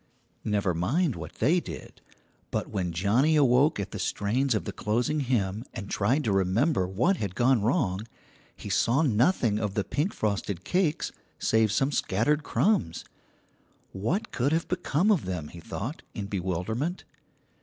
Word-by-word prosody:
Never 100 -4 0
mind 130 - +1
what - - -8
they 155 +10 +3
did; - - -9 0.5
but - - -2
when 90 -3 -1
Johnnie 110 - +2
awoke 140 -1 +4
at 100 - -4
the - - -5
strains 120 +5 0
of 105 - -2
the - - -3
closing 120 +8 0
hymn 110 -6 0
and 100 -4 -6
tried 125 +9 +1
to 110 - 0
remember 95 - +2
what 125 - +1
had 100 -3 -4
gone 125 -1 +3
wrong, 110 - 0 0.5
he - - -9
saw 130 +7 +2
nothing 120 - +2
of 105 -2 -2
the 105 - +1
pink 145 - -1
frosted 100 -3 -2
cakes 180 - 0 0.3
save 110 -2 +2
some 135 +6 +1
scattered 140 +6 +1
crumbs. 145 - 0 0.9
What 115 - -2
could 135 +5 0
have 165 +1 0
become 180 +2 +1
of 190 - +2
them, 90 -5 -4
he 85 - -11
thought, 120 - -5
in 105 - -3
bewilderment. 100 - -2
110 Hz, 155 wpm, -27 LUFS, 100-150 Hz, 0.9 s, awoke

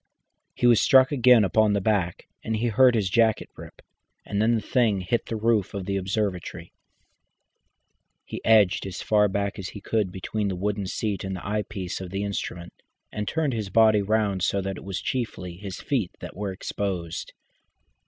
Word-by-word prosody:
He - - -1
was 120 -3 +6
struck 130 +1 +5
again 125 -4 +5
upon 105 +2 +3
the 100 - +1
back, 95 -4 -1 0.2
and 110 - -2
he 115 +2 0
heard 125 +2 +5
his 105 -4 +1
jacket 110 +3 +2
rip, - - -12 0.4
and 100 0 -1
then 115 +2 +3
the 110 - -1
thing 110 -4 +1
hit 115 +6 -1
the 115 - -3
roof 110 -2 +1
of 95 -2 -4
the 100 0 -2
observatory. 95 -3 -3 1.5
He - - -7
edged 105 -4 +4
as 95 -1 -6
far 105 -1 +3
as 100 -2 -2
he 105 - -9
could 105 -2 -1
between 100 +3 -3
the 95 - -2
wooden 100 +1 -2
seat 100 -1 -3
and 95 -1 -4
the 90 - -7
eyepiece 105 -3 -3
of 95 - -6
the 95 +2 -3
instrument, 90 -3 -5 0.4
and 105 -1 -4
turned 155 -4 0
his 110 -4 -3
body 110 0 +5
round 100 -2 0
so 100 - +1
that 95 0 -4
it - - -10
was 95 0 -5
chiefly 90 -8 -4
his 95 -1 -7
feet 115 -11 -1
that - - -9
were 100 0 -3
exposed. 95 -3 -4
100 Hz, 185 wpm, -25 LUFS, 95-110 Hz, 1.5 s, was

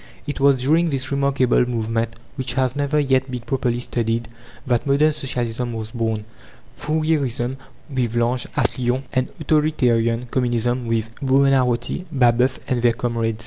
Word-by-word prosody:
It 145 - -4
was 140 -1 +5
during 165 +5 +3
this 135 -2 -2
remarkable 140 -3 +2
movement, 115 -1 -1 0.2
which 130 -2 -3
has 130 -1 +1
never 145 +1 +1
yet 130 -2 +1
been 125 -1 -4
properly 120 0 -1
studied, 115 -1 -1 0.4
that 125 0 0
modern 150 +3 +3
Socialism 125 -3 -3
was 110 -1 -5
born 110 -2 -2 0.5
Fourierism 145 -5 -1 0.3
with 125 -5 -2
L'Ange, 120 +1 0
at - - 0
Lyons, 125 +2 0
and 130 0 0
authoritarian 125 -7 +2
Communism 120 0 0
with 115 0 -1
Buonarroti, 135 +2 +2
Babeuf, 125 -1 +3
and 125 -2 0
their 120 -1 +4
comrades. 115 -2 -2
125 Hz, 145 wpm, -21 LUFS, 115-135 Hz, 0.5 s, was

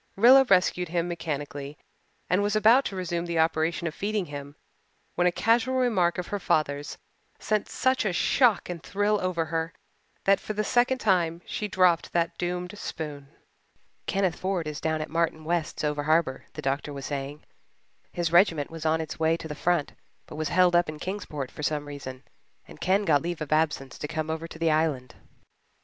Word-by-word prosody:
Rilla 255 +6 +7
rescued 180 -2 +3
him 170 0 0
mechanically 145 -4 -5 0.5
and 180 +3 +2
was 205 +1 0
about 225 +5 +5
to 195 - -4
resume 175 -2 -2
the 170 -1 -2
operation 160 0 +1
of 165 - -2
feeding 205 +2 -2
him 145 -1 -8 0.6
when 180 - +2
a - - +3
casual 235 +6 +2
remark 215 -10 +2
of 180 - -3
her 205 - -2
father's 145 -4 -1 0.4
sent 215 -2 -1
such 260 +1 +1
a 210 - 0
shock 235 +5 +3
and 175 -2 -6
thrill 205 +3 0
over 180 -3 -1
her 165 0 -1 0.5
that 195 0 +4
for 215 - -5
the 215 0 -1
second 245 +3 +2
time 175 -7 +1
she 210 - -3
dropped 180 -4 +2
that 170 -1 +1
doomed 180 +2 -3
spoon. 145 -3 -6 0.8
"Kenneth 190 -3 0
Ford 185 -4 -1
is 150 -1 -5
down 160 -1 0
at 155 - -5
Martin 165 -1 0
West's 170 -1 -2
over 150 -1 0
harbour," 155 -2 +1
the - - -7
doctor 140 +2 -1
was 140 -1 -6
saying. 145 +1 -5 0.7
"His 170 -2 -1
regiment 170 -5 +4
was 165 -1 -4
on 160 +1 +2
its 160 -1 -6
way 160 +1 +2
to 165 - -8
the 150 - -5
front 170 0 0 0.3
but - - -10
was 155 -1 -2
held 180 +1 +4
up 175 -2 +3
in 155 - -6
Kingsport 155 -7 -5
for - - -9
some 150 -1 -1
reason, 135 -2 -8 0.4
and 75 - -14
Ken 195 +2 +2
got 145 -5 +4
leave 175 0 -4
of 155 -2 -5
absence 155 -4 0
to 150 - -4
come 155 +1 -3
over 160 +1 -4
to 160 - -11
the 165 -1 +2
Island." 150 -6 0
165 Hz, 190 wpm, -27 LUFS, 155-185 Hz, 0.8 s, Rilla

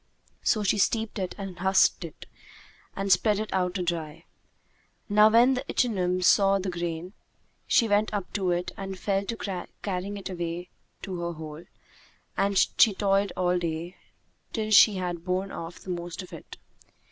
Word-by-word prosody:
So 215 - +1
she 205 +1 +1
steeped 220 +1 0
it 185 -1 -3
and 195 -3 -7
husked 190 0 +3
it 165 - -9 0.7
and 195 0 -1
spread 210 +3 +4
it 215 - -4
out 180 -1 0
to 185 - -1
dry. 165 -2 -4 0.8
Now 210 +1 +6
when 240 +4 +5
the 255 - -2
ichneumon 185 -6 0
saw 195 +1 +5
the 190 -1 -3
grain, 175 +1 -4 0.5
she 230 - +4
went 205 +1 +2
up 205 -3 -4
to 190 -3 0
it 175 0 -1
and 195 -1 -5
fell 195 +1 0
to 195 -5 -4 0.2
carrying 200 +1 -3
it 195 - -6
away 175 -1 -5 0.3
to 185 -2 -5
her 170 0 -3
hole, 155 0 -9 0.7
and 200 0 +1
she 215 +1 +4
toiled 195 -1 +1
all 180 -1 +2
day, 170 +1 -4 0.6
till 215 -2 -2
she 210 0 +7
had 175 -2 -3
borne 185 +2 -2
off 165 +1 -7
the 185 - -7
most 175 +1 -5
of 180 - -13
it. - - -10
190 Hz, 170 wpm, -27 LUFS, 175-205 Hz, 0.8 s, she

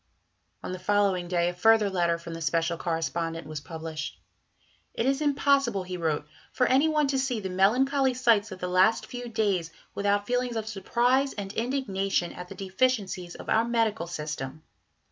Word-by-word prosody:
On - - -4
the 185 - -5
following 195 -2 +1
day 175 -1 +1
a - - -4
further 215 +4 +4
letter 175 -3 +1
from 170 0 -8
the 165 - -6
"Special 165 +1 +1
Correspondent" 165 -1 -2
was 155 -1 -6
published. 160 0 -6 0.8
"It 230 - 0
is 270 +2 +1
impossible," 275 -7 +2
he 180 0 -6
wrote, 160 -4 -1 0.3
"for 250 - +2
any 265 +5 +4
one 305 -1 +2
to 270 -1 +1
see 260 -3 -1
the 190 -3 -5
melancholy 260 +8 +3
sights 225 -4 +3
of 190 - -6
the 180 - -4
last 185 +5 +3
few 245 -1 -7
days 200 -7 0 0.2
without 205 0 +1
feelings 245 +1 -1
of 220 -1 -3
surprise 245 +7 +1
and 200 -1 -6
indignation 195 -8 -1
at 180 - -8
the - - -9
deficiencies 190 -3 -1
of - - -10
our 220 +1 +3
medical 225 -6 0
system. 150 -2 -5
200 Hz, 175 wpm, -27 LUFS, 175-245 Hz, 0.8 s, further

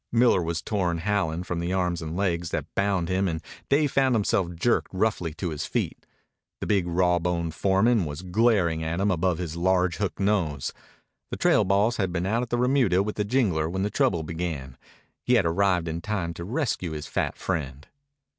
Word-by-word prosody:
Miller 120 -5 +4
was 85 -2 -2
torn 90 -5 0
howling 90 -2 -1
from 90 -1 -3
the 85 +1 -2
arms 90 -2 0
and 80 +1 -5
legs 85 -4 0
that - - -2
bound 100 -3 +1
him 95 +2 +1
and 80 -2 -2 0.3
Dave 145 0 +3
found 130 -2 +3
himself 100 -4 +1
jerked 120 +8 +1
roughly 95 -4 0
to 90 -1 -3
his 75 - -4
feet. - - -3 0.5
The - - -4
big 100 -4 +1
raw 90 0 +2
boned 85 -1 -1
foreman 100 +4 +2
was 75 +3 -6
glaring 90 -4 +2
at 80 +2 -2
him 100 +1 +2
above 90 -1 +1
his 85 -3 -4
large 90 0 +1
hook 100 -2 -2
nose. 95 -9 0 0.6
The - - -4
trail - - +4
boss 100 +5 +2
had 95 -4 0
been 90 0 -1
out 110 +5 +1
at 125 - -4
the 120 - 0
remuda 125 -7 +3
with 105 +1 -4
the 105 - 0
jingler 100 -9 +1
when 95 +2 -2
the 105 - -1
trouble 85 -4 +1
began. 80 -6 -4 0.5
He 125 - +3
had 110 - +3
arrived 90 0 +2
in 80 +1 -3
time 95 -5 -2
to 85 - -7
rescue 100 - -2
his 75 -1 -5
fat - - -2
friend. 75 -6 -3
90 Hz, 200 wpm, -26 LUFS, 85-105 Hz, 0.6 s, Miller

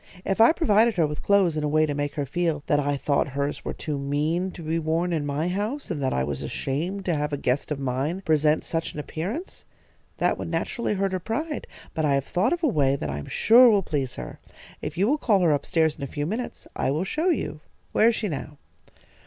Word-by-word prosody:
If 195 +3 +1
I 230 - +8
provided 230 - +3
her 170 -3 +3
with 150 0 -4
clothes 195 -5 +3
in 155 - -1
a - - +1
way 155 +1 +3
to 150 - -2
make 145 0 -2
her 145 - -1
feel 160 0 -1
that 145 - +2
I 145 0 0
thought 140 +1 +1
hers 140 +1 -2
were - - -3
too 150 -3 -3
mean 150 +6 0
to 170 - -9
be 160 +1 -1
worn 165 +2 0
in 150 -3 -1
my 145 +4 -1
house, 210 +8 -2
and 155 -4 -3
that 130 - 0
I 65 - 0
was 70 0 -3
ashamed 175 +9 -3
to 175 - +1
have 150 -1 -1
a 145 - -1
guest 130 0 -1
of 150 - -2
mine 135 +7 -2
present 155 -3 +2
such 165 0 -3
an - - -4
appearance, 190 - -5 0.5
that - - +1
would - - -4
naturally 235 -3 -1
hurt 195 0 0
her 185 - -1
pride; 295 - -3 0.3
but 160 - -1
I 145 -2 +3
have 140 -1 0
thought 180 +3 +1
of 345 0 -1
a - - +5
way 140 - +2
that 75 - -3
I 70 - -3
am 70 - -8
sure 245 +2 +6
will 205 -3 +3
please 140 -6 -2
her. 65 - -8 0.4
If 150 +2 -5
you 190 - +3
will 295 +5 +2
call 205 -8 +3
her 170 -3 +4
up 145 - -2
stairs 160 -2 +2
in - - -12
a - - -2
few 145 +1 -3
minutes, 225 +9 -4
I - - 0
will 150 +6 0
show 310 - 0
you. 220 - -1 0.3
Where 220 - +4
is 235 - +3
she 220 - -2
now?" 150 -3 -5
160 Hz, 250 wpm, -25 LUFS, 145-195 Hz, 0.5 s, I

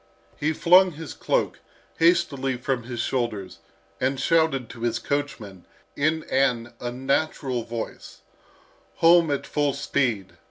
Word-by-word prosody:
He 150 +2 0
flung 180 +3 +5
his 160 0 -8
cloak - - -1 0.4
hastily 150 -6 +2
from 125 -1 -2
his 120 -1 -4
shoulders 115 -7 -3 0.4
and 130 +1 0
shouted 160 -7 +2
to - - -12
his 120 0 0
coachman 120 -11 -4 0.3
in 155 +2 +1
an 125 -3 0
unnatural 130 +1 -1
voice, 115 0 -7 0.7
"Home 170 -1 +5
at 140 -1 -1
full 145 -2 0
speed!" 120 -8 -1
135 Hz, 120 wpm, -25 LUFS, 120-155 Hz, 0.7 s, flung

